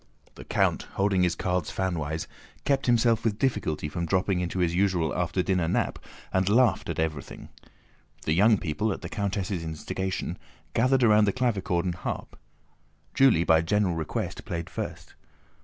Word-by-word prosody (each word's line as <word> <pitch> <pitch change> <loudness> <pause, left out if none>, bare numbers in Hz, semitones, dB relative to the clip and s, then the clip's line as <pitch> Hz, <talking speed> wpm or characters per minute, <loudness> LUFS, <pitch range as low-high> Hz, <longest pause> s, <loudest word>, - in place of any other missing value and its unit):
The - - -12
count, - - +1
holding 95 -1 +2
his 90 -1 +2
cards 90 -3 -1
fanwise, 80 -4 -2 0.4
kept 135 -2 +1
himself 115 -1 +3
with 110 -3 0
difficulty 105 - -1
from 85 +3 -3
dropping 95 +1 +1
into 90 +1 -3
his 85 -2 +1
usual 90 -4 +1
after 90 +1 0
dinner 90 -3 +1
nap, - - 0 0.3
and 95 +1 +2
laughed 120 +3 +3
at - - -3
everything. 80 -3 -4 0.7
The 80 - +1
young 105 +5 +5
people, 95 +6 -1
at - - -9
the - - -5
countess' 100 -2 -2
instigation, 90 +2 -3 0.3
gathered 130 +2 +3
round 105 -2 +5
the - - +4
clavichord 100 -8 0
and 90 - 0
harp. 90 - -5 0.8
Julie 130 -11 +5
by 80 -1 +4
general 95 +2 +1
request 80 -2 -3
played 85 -1 -5
first. - - -6
95 Hz, 155 wpm, -27 LUFS, 85-105 Hz, 0.8 s, young